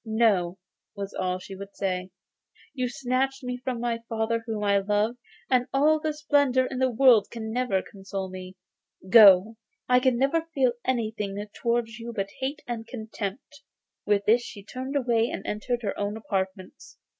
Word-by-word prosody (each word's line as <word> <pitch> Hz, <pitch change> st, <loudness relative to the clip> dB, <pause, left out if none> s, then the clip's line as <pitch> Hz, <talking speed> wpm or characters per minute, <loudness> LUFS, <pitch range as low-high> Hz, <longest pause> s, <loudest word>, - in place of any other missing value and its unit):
'No,' 215 Hz, -6 st, +2 dB, 0.4 s
was 200 Hz, -1 st, -5 dB
all 185 Hz, -1 st, -1 dB
she 190 Hz, +1 st, -9 dB
would 200 Hz, +1 st, -10 dB
say; 185 Hz, -1 st, -2 dB, 0.6 s
'you 255 Hz, -3 st, -1 dB
snatched 260 Hz, +2 st, -1 dB
me 250 Hz, 0 st, -3 dB
from 255 Hz, -2 st, -2 dB
my 235 Hz, -1 st, -1 dB
father 225 Hz, 0 st, 0 dB
whom 215 Hz, -2 st, -3 dB
I 200 Hz, -1 st, +3 dB
loved, 210 Hz, +4 st, 0 dB, 0.3 s
and 250 Hz, -1 st, +2 dB
all 305 Hz, +3 st, +3 dB
the 310 Hz, 0 st, -1 dB
splendour 285 Hz, -4 st, +2 dB
in 255 Hz, 0 st, -4 dB
the 260 Hz, 0 st, +3 dB
world 240 Hz, -3 st, +5 dB
can 220 Hz, -1 st, -6 dB
never 245 Hz, -6 st, 0 dB
console 195 Hz, -1 st, -6 dB
me. 185 Hz, 0 st, -9 dB, 0.6 s
Go! 210 Hz, 0 st, +8 dB, 0.3 s
I 250 Hz, 0 st, +5 dB
can 255 Hz, -1 st, +2 dB
never 320 Hz, +6 st, +1 dB
feel 260 Hz, -3 st, +3 dB
anything 215 Hz, -5 st, -2 dB, 0.2 s
towards 235 Hz, -1 st, -1 dB
you 235 Hz, +1 st, -6 dB
but 195 Hz, -2 st, -3 dB
hate 270 Hz, +3 st, -3 dB
and 230 Hz, -2 st, -5 dB
contempt.' 220 Hz, +3 st, -6 dB, 0.4 s
With 205 Hz, -1 st, +1 dB
these 225 Hz, +3 st, +6 dB
words 245 Hz, -, -10 dB
she 200 Hz, -, -9 dB
turned 260 Hz, +6 st, -6 dB
away 240 Hz, -4 st, +2 dB
and -, -, -6 dB
entered 240 Hz, +3 st, -2 dB
her 200 Hz, -, -2 dB
own 205 Hz, +1 st, -2 dB
apartments. 190 Hz, -2 st, -5 dB
230 Hz, 170 wpm, -26 LUFS, 200-255 Hz, 0.6 s, Go